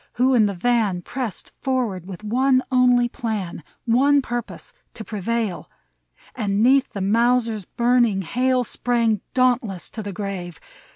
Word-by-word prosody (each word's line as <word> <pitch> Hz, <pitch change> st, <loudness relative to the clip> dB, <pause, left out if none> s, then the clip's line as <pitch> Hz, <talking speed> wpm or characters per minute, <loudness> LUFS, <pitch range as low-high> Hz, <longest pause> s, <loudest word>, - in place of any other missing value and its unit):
who 255 Hz, +2 st, +2 dB
in 220 Hz, -4 st, +4 dB
the 200 Hz, -, -3 dB
van 215 Hz, -2 st, +1 dB
Pressed 250 Hz, -3 st, -5 dB
forward, 235 Hz, -9 st, -1 dB
with 195 Hz, +1 st, -9 dB
one 255 Hz, +4 st, +2 dB
only 250 Hz, -1 st, +4 dB
plan 210 Hz, -9 st, -4 dB, 0.2 s
— -, -, -51 dB, 0.2 s
One 285 Hz, 0 st, +5 dB
purpose, 240 Hz, -3 st, -5 dB, 0.2 s
to 220 Hz, -, -6 dB
prevail; 215 Hz, -2 st, -3 dB, 0.6 s
And 205 Hz, -3 st, 0 dB
'neath 265 Hz, +1 st, +3 dB
the 200 Hz, -, -4 dB
Mausers' 230 Hz, 0 st, +1 dB
burning 235 Hz, -4 st, +2 dB
hail 255 Hz, +6 st, +1 dB
Sprang 230 Hz, -3 st, 0 dB
dauntless 245 Hz, -7 st, +1 dB
to 220 Hz, -, -6 dB
the 205 Hz, -1 st, -5 dB
grave. 180 Hz, -4 st, -6 dB
230 Hz, 140 wpm, -22 LUFS, 200-250 Hz, 0.6 s, One